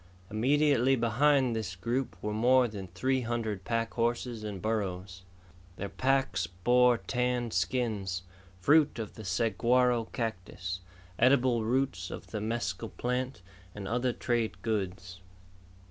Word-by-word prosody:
Immediately 135 +3 +3
behind 130 +2 +3
this 100 -5 -3
group 120 +8 -2
were 105 - -1
more 125 +3 +4
than 100 -4 -7
three 130 +10 0
hundred 115 -5 -2
pack 115 +1 -1
horses 120 -1 -1
and 105 -3 -5
burros. 95 -4 -3 0.5
Their 100 +2 -5
packs 130 -9 +1
bore 120 +8 +3
tanned 125 -1 -1
skins, 95 -1 -1 0.4
fruit 150 - +4
of 110 -3 -5
the 110 - -9
saguaro 115 +5 +2
cactus, 95 -5 -4 0.4
edible 125 -2 +4
roots 115 -6 0
of - - -8
the 105 - -3
mescal 110 -1 -2
plant, 125 -3 -3 0.3
and 100 -2 -6
other 125 +2 +1
trade 120 -2 -1
goods. 95 -4 -3
115 Hz, 125 wpm, -30 LUFS, 95-125 Hz, 0.5 s, more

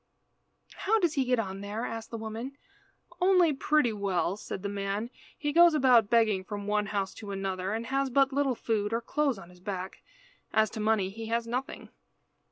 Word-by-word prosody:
"How 440 +3 +2
does 345 -7 +1
he 270 -4 +1
get 250 0 +2
on 195 -3 -3
there?" 210 +4 -4
asked 225 0 -6
the 230 - -5
woman. 225 +5 -6 0.6
"Only 360 -4 +5
pretty 275 -3 +2
well," 195 -3 0
said 200 -2 -7
the - - -1
man. 200 +3 -3 0.3
"He 295 -1 -2
goes 340 0 +7
about 250 -7 +5
begging 220 -5 +3
from 205 +1 -6
one 210 0 0
house 200 -2 -2
to 210 - -9
another, 195 -1 -3
and 225 +2 -2
has 270 +2 0
but 270 +1 +3
little 275 -2 +1
food, 220 -2 -1
or 230 - 0
clothes 280 0 0
on 180 -2 -12
his 180 - -18
back. 185 0 -5 0.5
As 220 -1 +3
to 220 - -6
money 210 -3 +1
he 225 +2 -7
has 230 +1 0
nothing." 250 +3 -4
225 Hz, 190 wpm, -29 LUFS, 200-265 Hz, 0.6 s, goes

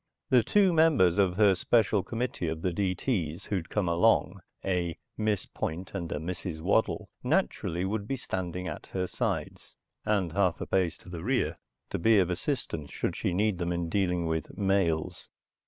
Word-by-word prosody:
The 125 -2 +7
two 190 - +3
members 145 - +4
of 95 -3 +3
her 105 -2 +6
special 105 +2 +2
committee 115 -5 -3
of 80 0 -3
the 90 - 0
D.T.'s 90 - -1
who'd 95 -5 -3
come 105 -4 0
along, 90 +1 +3 0.3
a 90 -3 0 0.2
Miss 105 -3 0
Point 85 +4 -5
and 85 -4 -4
a - - -1
Mrs. 85 +1 -4
Waddle, 100 +7 +1
naturally 85 +7 0
would 100 +1 -2
be 135 - -1
standing 90 -6 -4
at - - -6
her 95 -1 0
sides, - - -3 0.3
and 100 -6 +1
a - - -11
half 90 -3 +1
pace 90 -4 +1
to - - -15
the 85 -2 -6
rear, - - 0 0.3
to - - -2
be 110 +5 +5
of 90 -2 +3
assistance 90 - -3
should - - -2
she - - -1
need 100 +1 +1
them 85 0 -1
in 85 -1 -2
dealing 90 -2 +1
with 80 +1 -3
males. 95 -5 0
95 Hz, 175 wpm, -29 LUFS, 85-105 Hz, 0.3 s, The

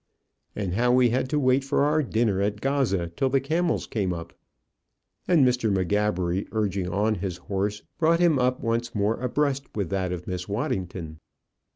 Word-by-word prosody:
"And 95 -4 -2
how 120 +5 +2
we 125 -1 +4
had 130 +1 0
to 150 - 0
wait 130 0 +3
for 135 +1 +1
our 150 +2 +3
dinner 110 -7 0
at 105 +1 -1
Gaza 125 -11 0
till 135 - +1
the 135 +1 +3
camels 160 +5 0
came 95 -5 -1
up?" 85 -1 -7 0.9
And 165 -7 +5
Mr. 125 -3 +2
M'Gabbery, 95 -1 0
urging 100 -4 -1
on 105 +3 +1
his 95 -3 -3
horse, 100 +3 -3 0.2
brought 165 0 +3
him 170 -6 +4
up 125 +1 +1
once 115 -1 -1
more 105 +3 0
abreast 140 +1 0
with 100 -5 -2
that 95 -2 -1
of 90 -1 -5
Miss 90 0 -5
Waddington. 90 -6 -3
110 Hz, 175 wpm, -25 LUFS, 95-130 Hz, 0.9 s, And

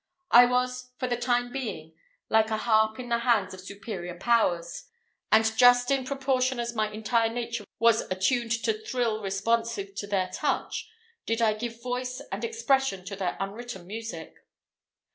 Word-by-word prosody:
I 245 +1 +9
was, 250 0 -1
for 255 - -2
the 245 - 0
time 245 0 0
being, 215 - -5 0.3
like 220 0 +3
a 220 - 0
harp 220 0 +2
in 245 -1 -6
the 235 0 +2
hands 230 -6 +2
of 185 - -9
superior 195 -3 -7
powers, 175 -6 +1 0.5
and 220 0 +4
just 245 +2 +6
in 270 -2 +1
proportion 265 -2 0
as 235 0 -2
my 215 -2 0
entire 225 +2 +1
nature 235 -2 -4
was 230 0 +4
attuned 230 +6 0
to 445 - +2
thrill 240 - -1
responsive 205 +1 -1
to 205 +1 -5
their 190 -2 0
touch, - - -2 0.4
did 225 +1 0
I 225 -2 +3
give 230 +2 -6
voice 250 0 -3
and - - -4
expression 270 - 0
to 200 0 -5
their 190 -2 -2
unwritten 200 -1 -6
music. 200 -5 -7
230 Hz, 160 wpm, -27 LUFS, 205-245 Hz, 0.5 s, I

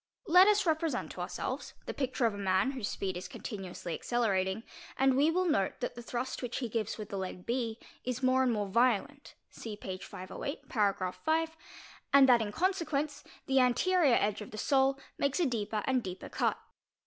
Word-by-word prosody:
Let 365 +3 +7
us 420 -1 +4
represent 320 -1 0
ourselves - - -4
the - - -4
picture 260 -2 -1
of 225 - +2
a - - -7
man 190 +7 +2
whose 255 -7 -3
speed 190 -2 -3
is 180 - -5
continuously 185 -5 -6
acceleratil 200 -4 0 0.3
and 270 -1 +4
we 290 +4 +4
will 365 +3 +1
note 200 - +1
that - - -3
the 240 - -8
thrust 245 +2 -4
which 245 -2 -3
he 245 -4 -3
gives 220 -2 -2
with 215 -2 -7
the 200 - -3
leg 185 -1 -5
B 235 -2 -1 0.3
is 250 +1 -3
m 255 - +5
and 260 -1 +3
more 210 -2 0
violent 245 +6 +1 0.2
(see 215 -2 -7
page 190 -2 -6
508, 185 +10 -6
para. 200 -5 +1
5), 320 0 0 0.6
and 275 -1 +8
that 245 -2 +6
in 210 -2 -2
consequence 310 - -1 0.3
¢ 265 0 +4
anterior 280 +3 +4
edge 210 +1 0
of 210 - -7
the 215 - -9
sole 270 +3 +3 0.2
makes 280 +4 +1
a 350 - +3
deeper 215 -4 -1
and 260 -1 +2
deeper 185 -3 -7
cut. - - 0
245 Hz, 190 wpm, -31 LUFS, 205-280 Hz, 0.6 s, and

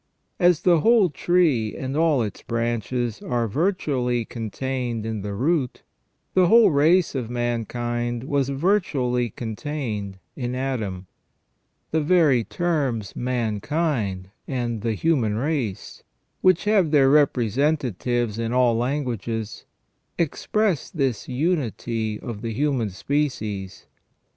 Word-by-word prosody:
As 175 -3 +4
the 175 -3 +5
whole 220 -2 +4
tree 150 -10 +2
and 135 +1 -4
all 155 -5 +3
its 105 - -6
branches 120 0 -2
are 120 -2 -1
virtually 130 - 0
contained 120 0 -4
in 110 -2 -3
the 100 0 -4
root, 135 +2 0 0.5
the 185 -1 +4
whole 225 0 +6
race 160 +5 +3
of 125 -5 -3
mankind 120 0 -2
was 140 -1 0
virtually 140 - +1
contained 110 -4 -4 0.2
in 125 -2 -3
Adam. 110 -9 -3 0.9
The 160 - +2
very 150 -7 +4
terms 140 - -1
mankind 115 - -1 0.2
and 120 -4 -2
the 115 0 -1
human 120 -6 +1
race, 130 -6 -3 0.4
which 185 -2 +4
have 205 -6 +3
their 145 -3 +5
representatives 125 - +1
in 115 0 -1
all 125 -2 +3
languages, 115 -4 -3 0.5
express 180 +2 0
this 135 - -1
unity 120 - -1
of 110 -4 -7
the 115 -1 -3
human 130 -3 0
species. 105 -5 -3
125 Hz, 115 wpm, -24 LUFS, 115-150 Hz, 0.9 s, whole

